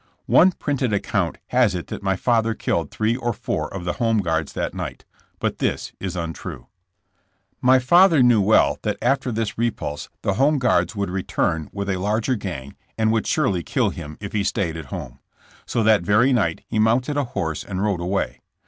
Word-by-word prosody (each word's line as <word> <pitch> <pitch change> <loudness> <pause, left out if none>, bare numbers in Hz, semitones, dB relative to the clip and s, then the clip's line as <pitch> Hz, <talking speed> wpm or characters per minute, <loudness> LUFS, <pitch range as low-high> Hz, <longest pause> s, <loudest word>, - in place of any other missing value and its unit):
One 185 +2 +6
printed 135 -8 -1
account 100 -3 -1
has 125 -7 +3
it 90 - -4
that - - -5
my 95 -1 +1
father 115 +1 +1
killed 85 -7 -1
three 110 +2 0
or 120 -2 -2
four - - -3
of 95 -2 -6
the 85 - -1
Home 115 -1 +3
Guards 80 -6 -1
that - - -3
night, - - -6 0.3
but - - -2
this - - -1
is 95 -1 -4
untrue. 85 -2 -5 1.0
My 130 +1 +6
father 165 +3 +5
knew 120 -4 +5
well 105 +3 +3
that - - -2
after 135 -2 +1
this 110 -1 -3
repulse 110 -11 -2
the 100 - +1
Home 140 +8 +3
Guards 110 -7 +1
would 100 -3 -2
return 80 -4 -1
with 100 -1 -4
a 95 -2 0
larger 110 +6 0
gang 85 - -5 0.2
and 110 0 +2
would 110 -1 0
surely 130 - +1
kill - - 0
him 75 +1 -8
if 100 -1 -7
he 105 -2 +1
stayed 90 -4 -1
at 80 -2 -6
home. - - -7 0.5
So 115 - 0
that 110 -2 +5
very 105 +9 +3
night 95 -9 +1
he 110 - -1
mounted 120 +6 +2
a 145 - +1
horse 90 - -3
and 95 0 -3
rode 100 -5 0
away. 95 +3 -2
105 Hz, 195 wpm, -22 LUFS, 90-120 Hz, 1.0 s, One